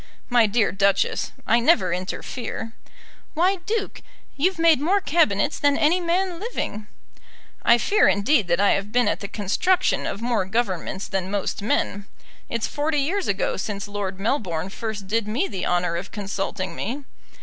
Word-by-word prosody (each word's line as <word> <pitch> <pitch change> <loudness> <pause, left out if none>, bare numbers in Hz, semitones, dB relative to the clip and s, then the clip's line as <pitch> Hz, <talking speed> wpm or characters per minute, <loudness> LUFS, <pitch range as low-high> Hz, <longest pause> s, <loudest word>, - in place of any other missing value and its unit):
"My 240 -3 +5
dear 215 +1 +2
Duchess, 200 0 +1
I 235 - +4
never 235 - +3
interfere." 225 +5 -5 0.6
"Why, 370 +5 +3
Duke, 435 -2 -2 0.3
you've 365 +6 +1
made 330 -4 +4
more 375 +7 +3
Cabinets 295 - +1
than 285 -1 +3
any 325 +5 +3
man 355 0 0
living." 220 - -4 0.7
"I 235 - +5
fear, 405 - +3
indeed, 205 +1 +3
that 170 +1 +1
I 205 - +4
have 200 +1 -1
been 245 +1 +3
at - - 0
the 200 - -5
construction 230 - +1
of 200 - -4
more 230 -4 0
Governments 190 -2 -2
than 190 -1 -2
most 200 -1 -2
men. 205 -3 -1 0.4
It's 230 -1 -1
forty 295 +1 -1
years 360 +8 -1
ago - - 0
since 205 -1 -4
Lord 200 -2 -4
Melbourne 195 - -1
first 215 0 -5
did 215 +2 -1
me 245 - 0
the 190 - -4
honour 175 -1 +1
of 185 +3 -6
consulting 195 -3 -4
me. 265 +7 -4
225 Hz, 160 wpm, -23 LUFS, 195-310 Hz, 0.7 s, My